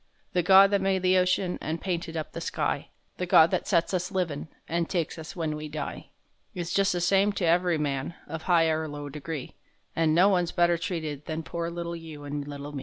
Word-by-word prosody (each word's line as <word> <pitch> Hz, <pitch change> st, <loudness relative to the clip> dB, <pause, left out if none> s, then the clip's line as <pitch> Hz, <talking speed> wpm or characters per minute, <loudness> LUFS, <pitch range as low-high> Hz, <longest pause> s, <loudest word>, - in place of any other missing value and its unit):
The 180 Hz, -, +3 dB
Gawd 195 Hz, +3 st, +7 dB
that 200 Hz, -1 st, +2 dB
made 190 Hz, -1 st, +1 dB
the 185 Hz, 0 st, +4 dB
ocean 180 Hz, 0 st, +1 dB
An' 160 Hz, +2 st, -2 dB
painted 170 Hz, -2 st, -3 dB
up 155 Hz, -, -4 dB
the -, -, -6 dB
sky, -, -, -2 dB, 0.3 s
The 180 Hz, -, -3 dB
Gawd 165 Hz, 0 st, +6 dB
that 185 Hz, -, -1 dB
sets 170 Hz, -1 st, +2 dB
us 185 Hz, +1 st, -1 dB
livin' 170 Hz, -6 st, -2 dB, 0.2 s
An' 170 Hz, 0 st, -1 dB
takes 170 Hz, -2 st, -2 dB
us 160 Hz, +5 st, -8 dB
when 160 Hz, -3 st, -2 dB
we 150 Hz, 0 st, -6 dB
die, -, -, -6 dB, 0.5 s
Is 175 Hz, -1 st, -3 dB
just 195 Hz, 0 st, +3 dB
the 175 Hz, -, -1 dB
same 195 Hz, +3 st, +3 dB
to 190 Hz, -, -1 dB
ev'ry 175 Hz, 0 st, +3 dB
man, 145 Hz, +1 st, -2 dB
Of 160 Hz, -1 st, -6 dB
high 165 Hz, -2 st, +5 dB
or 155 Hz, 0 st, -1 dB
low 145 Hz, -1 st, -6 dB
degree, 150 Hz, -1 st, -6 dB, 0.4 s
An' 160 Hz, -1 st, +2 dB
no 180 Hz, +3 st, +6 dB
one's 180 Hz, -4 st, +2 dB
better 175 Hz, -1 st, +3 dB
treated 155 Hz, -5 st, -4 dB
than 160 Hz, 0 st, -3 dB
Poor 170 Hz, +1 st, -3 dB
little 170 Hz, 0 st, -4 dB
you 160 Hz, -3 st, -9 dB
and 145 Hz, 0 st, -4 dB
little 145 Hz, 0 st, -7 dB
me. 145 Hz, -, -5 dB
170 Hz, 220 wpm, -27 LUFS, 155-180 Hz, 0.5 s, Gawd